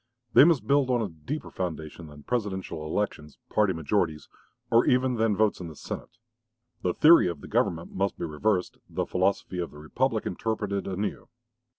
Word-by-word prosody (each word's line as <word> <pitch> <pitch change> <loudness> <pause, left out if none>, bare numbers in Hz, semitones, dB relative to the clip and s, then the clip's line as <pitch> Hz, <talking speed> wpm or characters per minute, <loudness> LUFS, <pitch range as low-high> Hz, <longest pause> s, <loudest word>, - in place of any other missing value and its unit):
They - - +9
must 165 -5 +3
build 140 -2 +3
on 120 -2 +2
a 105 - -3
deeper 85 - -6
foundation 80 -2 -5
than 75 -1 -13
Presidential 95 -9 -3
elections, 75 -5 -3
party 105 -2 +3
majorities, 80 -1 -1 0.4
or 115 +1 +6
even 130 0 +3
than 110 -2 +2
votes 110 0 +2
in 90 - -6
the 80 - -9
Senate. 115 - -7 0.6
The 90 - 0
theory 165 - +7
of 85 -5 -4
the - - -9
government 80 0 0
must 100 +1 -1
be - - -3
reversed, 90 +5 -1
the - - -2
philosophy 95 0 0
of 85 - -2
the 75 - -14
republic 110 - -1
interpreted 105 0 -2
anew. 100 +2 -3
95 Hz, 175 wpm, -27 LUFS, 80-115 Hz, 0.6 s, They